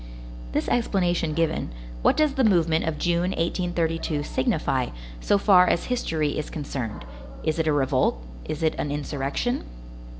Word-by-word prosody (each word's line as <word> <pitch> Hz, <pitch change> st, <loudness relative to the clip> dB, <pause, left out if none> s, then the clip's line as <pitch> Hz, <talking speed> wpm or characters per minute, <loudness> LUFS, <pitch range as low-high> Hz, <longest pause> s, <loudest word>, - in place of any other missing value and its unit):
This -, -, 0 dB
explanation 175 Hz, -8 st, +1 dB
given, 165 Hz, -1 st, 0 dB, 0.3 s
what -, -, +3 dB
does 305 Hz, -2 st, +3 dB
the 270 Hz, -1 st, +1 dB
movement 170 Hz, -7 st, +3 dB
of 160 Hz, -2 st, -2 dB
June, 175 Hz, +2 st, +1 dB
1832, 165 Hz, -3 st, -1 dB
signify, 130 Hz, -2 st, 0 dB, 0.3 s
so 205 Hz, -, +2 dB
far 190 Hz, -3 st, +6 dB
as -, -, +2 dB
history 155 Hz, -11 st, -1 dB
is 150 Hz, -, -5 dB
concerned? 130 Hz, -, -5 dB, 0.4 s
Is 155 Hz, +1 st, 0 dB
it 160 Hz, -, +1 dB
a -, -, +4 dB
revolt? 135 Hz, -, +2 dB, 0.3 s
Is 155 Hz, +1 st, -4 dB
it 160 Hz, -, +3 dB
an 145 Hz, -, -1 dB
insurrection? 145 Hz, -, -2 dB
160 Hz, 145 wpm, -25 LUFS, 150-180 Hz, 0.4 s, far